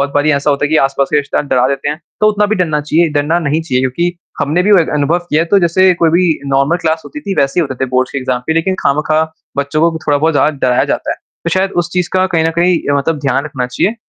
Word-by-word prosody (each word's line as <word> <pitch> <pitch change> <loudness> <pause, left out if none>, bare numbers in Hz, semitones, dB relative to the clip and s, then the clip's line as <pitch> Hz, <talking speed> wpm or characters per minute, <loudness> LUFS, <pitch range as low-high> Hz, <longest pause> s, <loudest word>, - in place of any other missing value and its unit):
बहुत 140 0 0
बारी 145 +1 +2
ऐसा 140 +1 +1
होता 140 0 0
है - - 0
कि 155 - +2
आस-पास 135 -1 +1
के - - +4
रिश्तेदार 145 0 -1
डरा 125 -1 +2
देते 140 +1 -2
हैं, 150 +2 -4 0.2
तो 215 - +4
उतना 210 0 +1
भी 215 - 0
डरना 160 -5 0
चाहिए, 160 +3 +1
डरना 150 +3 +1
नहीं 155 -1 -1
चाहिए 130 -6 -1
क्योंकि 170 +7 -1 0.3
हमने 150 +5 +1
भी 205 +3 +3
वो 195 - +7
एक 165 - -1
अनुभव 150 +4 +1
किया 155 +2 +3
है 170 - -4
तो 200 - +6
जैसे 185 +1 +3
कोई 165 - +4
भी 175 +2 +3 0.2
नॉर्मल 140 +4 +1
क्लास 160 0 0
होती 300 - -8
थी 200 -7 -4
वैसे 140 +5 +1
ही - - +2
होते 130 - -6
थे - - -7
बोर्ड्स 130 0 +1
के 140 - -2
एग्ज़ाम 130 -1 -2
पे 160 - +1
लेकिन 165 +4 0
खामख़ा 155 +2 +1 0.3
बच्चों 155 +4 +1
को 165 - -6
थोड़ा-बहुत 150 +2 +2
ज़्यादा 150 +1 +2
डराया 125 - +2
जाता - - -3
है। - - -2 0.3
तो 170 - -1
शायद 190 +3 +1
उस 175 0 -5
चीज़ 180 -1 0
का 185 0 +2
कहीं 165 -3 0
न 165 - +2
कहीं 175 0 +3
अ, - - +2
मतलब 150 +3 -1
ध्यान 140 0 0
रखना 135 -4 -3
चाहिए 125 - -1
155 Hz, 280 wpm, -14 LUFS, 140-175 Hz, 0.3 s, वो